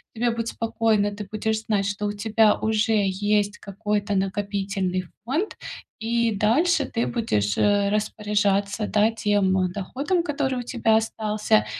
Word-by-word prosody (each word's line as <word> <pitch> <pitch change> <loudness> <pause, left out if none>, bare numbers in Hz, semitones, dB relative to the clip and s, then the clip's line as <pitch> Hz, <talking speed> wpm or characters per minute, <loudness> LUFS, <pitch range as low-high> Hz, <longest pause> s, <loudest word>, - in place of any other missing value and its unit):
тебе 235 +1 +1
будет 230 0 -3
спокойно, 220 -3 0
ты 205 0 -7
будешь 220 0 -1
знать, 210 -3 +1
что 205 +1 -3
у - - -1
тебя 215 +1 +3
уже 220 +1 +1
есть 205 +2 0
какой-то 205 0 -2
накопительный 195 -1 -1 0.2
фонд, 310 - -2 0.4
и 235 +1 +1
дальше 280 - +2
ты 230 -2 -1
будешь, 105 - 0
э, 205 -1 +3
распоряжаться, 205 0 0
да, 210 +1 +3
тем, 205 -4 +1
э, 185 - +2
доходом, 280 - -1
который 270 -5 -1
у - - -4
тебя 230 -2 +1
остался. 215 -1 +1
210 Hz, 140 wpm, -24 LUFS, 205-225 Hz, 0.4 s, тебя